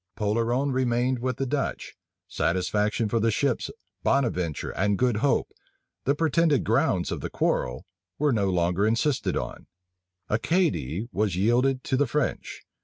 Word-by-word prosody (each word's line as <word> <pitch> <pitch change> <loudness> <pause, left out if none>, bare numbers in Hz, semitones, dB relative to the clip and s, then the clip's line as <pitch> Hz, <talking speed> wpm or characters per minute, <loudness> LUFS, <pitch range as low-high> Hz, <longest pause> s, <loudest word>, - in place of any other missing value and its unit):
Polerone 115 +6 0
remained 125 0 +1
with 130 0 -2
the 135 - -1
Dutch; 140 +2 -3 0.3
satisfaction 105 +7 0
for 115 +2 0
the 115 +1 +2
ships 125 +3 0 0.3
Bonaventure 90 - 0
and 100 +1 0
Good 125 -2 +2
Hope, 135 +6 +1 0.5
the 140 - +2
pretended 160 -1 +2
grounds - - +1
of - - -3
the - - -4
quarrel, 60 0 -1 0.3
was 145 -2 +2
no 100 -4 +1
longer 90 +3 +1
insisted 120 +5 +1
on; - - -6 0.6
Acadie 115 - 0
was 105 -3 0
yielded 125 +7 +2
to 130 - 0
the 145 0 +2
French. 150 +2 -2
120 Hz, 140 wpm, -26 LUFS, 105-135 Hz, 0.6 s, the